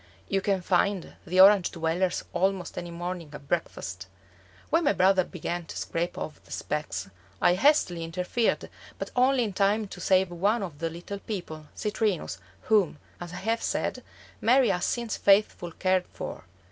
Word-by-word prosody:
You 195 0 0
can 195 -1 +1
find 190 0 +1
the 185 +3 +1
Orange 195 -1 +8
dwellers 170 +2 -1
almost 185 0 0
any 175 - -5
morning 175 -1 -5
at 140 -1 -10
breakfast. 95 - -3 0.6
When 330 +2 +3
my 290 - +4
brother 185 0 +4
began 175 -1 -4
to - - -8
scrape 170 +1 -2
off 155 - -6
the - - -22
specks, 150 - -3 0.3
I 175 - +5
hastily 185 - +3
interfered, 180 +7 -1 0.3
but - - -5
only 255 0 +4
in 210 -3 -3
time 205 +3 +2
to - - -9
save 190 -1 +3
one 200 +6 +1
of 160 -6 -7
the 165 0 -1
little 175 +5 -7
people, 165 -8 -6
Citrinus, 210 - -1 0.2
whom, 205 -8 +2 0.2
as 175 -1 -7
I - - -8
have 230 +1 +1
said, - - -1 0.4
Mary 250 0 +5
has 180 -2 +1
since 235 -2 -2
faithfully 195 -4 +3
cared 185 -1 +1
for. - - -7
185 Hz, 165 wpm, -27 LUFS, 170-205 Hz, 0.6 s, Orange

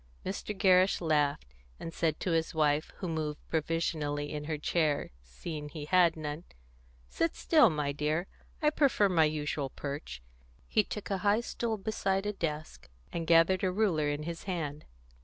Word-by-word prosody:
Mr. 200 +2 -4
Gerrish 185 0 +4
laughed, 145 - 0 0.3
and 165 - -6
said 160 -2 0
to 180 - -1
his 165 +1 0
wife, 150 0 +2
who 185 - -4
moved 155 -2 -2
provisionally 155 -2 -1
in 150 0 -4
her 155 0 -2
chair, 150 -1 0
seeing 150 - -7
he 145 0 -7
had 170 0 +4
none, 150 +1 -5 0.6
"Sit 160 - -1
still, 305 -8 +5
my 150 -3 -1
dear; 150 +4 -1 0.4
I 300 - +5
prefer 270 -9 +3
my 165 -4 +4
usual 150 -2 -2
perch." 140 - -6 0.4
He 215 - +3
took 205 0 -6
a 195 - 0
high 205 +4 +3
stool 235 -2 -2
beside 195 -2 -1
a 210 - -1
desk, 155 - -5 0.2
and 165 -1 -3
gathered 170 +3 +5
a 185 - +2
ruler 180 -7 +1
in 145 +1 -2
his 170 +1 -6
hand. 155 -6 -4
160 Hz, 165 wpm, -31 LUFS, 150-185 Hz, 0.6 s, still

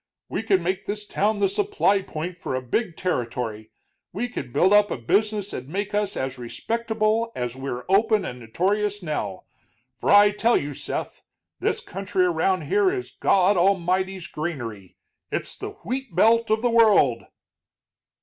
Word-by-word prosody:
We - - -2
could 200 -4 +2
make 185 +2 -2
this 210 0 -3
town 210 +1 0
the 200 -1 +3
supply 295 - +1
point 170 0 -5
for 150 -6 -4
a 130 - -2
big 170 - -2
territory, 115 -9 -3 0.4
we 225 +7 -2
could 135 - -6
build 180 +9 +3
up 205 0 +5
a - - -3
business 205 - 0
that'd 130 +2 -6
make 200 +4 -3
us 205 -1 0
as 130 0 -3
respectable 225 - -1
as 125 0 -3
we're 130 -2 -5
open 210 +1 +3
and 125 -5 -6
notorious 200 - -1
now. 105 - -3 0.6
For - - -2
I 205 0 +7
tell 225 +3 +2
you, 145 0 -3
Seth, - - -5 0.4
this - - 0
country 190 -1 -1
around 180 +2 +1
here 400 -1 +2
is 375 -1 -4
God 190 +1 +3
Almighty's 185 0 +1
granary 120 - -6 0.3
it's - - -3
the - - -7
wheat 255 -4 -4
belt 230 +4 +4
of 220 +1 +1
the 245 - +2
world." 210 - +4
190 Hz, 160 wpm, -24 LUFS, 145-215 Hz, 0.6 s, I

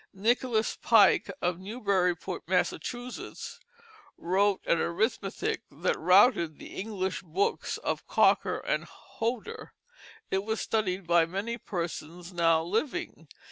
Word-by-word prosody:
Nicholas 225 +2 +1
Pike 220 -4 +5
of 175 0 0
Newburyport, 190 -5 -1
Massachusetts, 240 +7 -3 0.6
wrote 195 +3 +2
an 170 - +2
arithmetic 220 - -1
that 485 - -1
routed 185 - +4
the - - -11
English 190 -2 -3
books 185 +3 -1
of - - -3
Cocker - - +3
and - - -2
Hodder. 250 - -5 0.6
It 190 0 +1
was 220 +1 -2
studied 195 -4 -1
by 170 -1 +4
many 200 +7 -3
persons 175 0 -5
now 165 -2 +3
living. 240 - -3
195 Hz, 110 wpm, -29 LUFS, 175-225 Hz, 0.6 s, Pike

